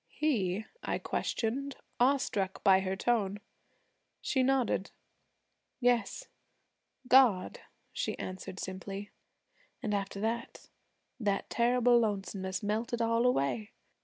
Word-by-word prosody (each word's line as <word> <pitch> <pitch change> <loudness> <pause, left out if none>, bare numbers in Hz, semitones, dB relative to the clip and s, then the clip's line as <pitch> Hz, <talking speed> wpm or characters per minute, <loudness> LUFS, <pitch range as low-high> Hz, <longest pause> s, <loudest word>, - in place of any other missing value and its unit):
'He?' 215 -9 0 0.2
I - - -1
questioned, 270 +5 -2 0.2
awestruck 245 -7 +1
by 190 -2 +6
her 190 0 -2
tone. 205 -2 0 0.8
She 265 - 0
nodded. 255 -6 +1 0.9
'Yes, 245 -4 +1 0.8
God,' 250 -8 +5 0.3
she - - -2
answered 185 0 -6
simply. 195 +2 -6 0.7
'An' 210 - -1
after 200 0 -2
that, 230 +2 -3 0.5
that 200 -4 -1
terrible 245 0 +4
lonesomeness 195 -3 -2
melted 225 +3 -1
all 230 +1 +2
away. 135 - 0
215 Hz, 100 wpm, -31 LUFS, 190-245 Hz, 0.9 s, by